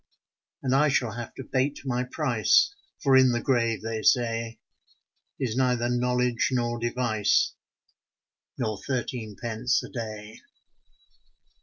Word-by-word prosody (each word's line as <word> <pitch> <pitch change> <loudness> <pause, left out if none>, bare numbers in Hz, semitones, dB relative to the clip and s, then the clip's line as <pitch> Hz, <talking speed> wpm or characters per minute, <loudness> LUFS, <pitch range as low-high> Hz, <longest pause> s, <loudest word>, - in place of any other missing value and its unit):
And 130 -1 +1
I 145 +3 +4
shall 125 -4 +1
have 120 +1 -7
to 135 - -7
bate 135 +3 -1
my 125 -1 0
price, 150 - +2 0.3
For 135 -2 +5
in 130 -1 +6
the 120 - 0
grave, 115 -5 0
they 110 -1 -3
say, 115 -2 +1 0.8
Is 125 -5 -1
neither 125 -2 +1
knowledge 125 -1 +1
nor 120 -2 -1
device 115 -4 +1 1.0
Nor 110 -5 -2
thirteen 120 -5 -3
pence 120 +2 0
a - - -8
day. 110 -4 -7
120 Hz, 125 wpm, -26 LUFS, 115-130 Hz, 1.0 s, in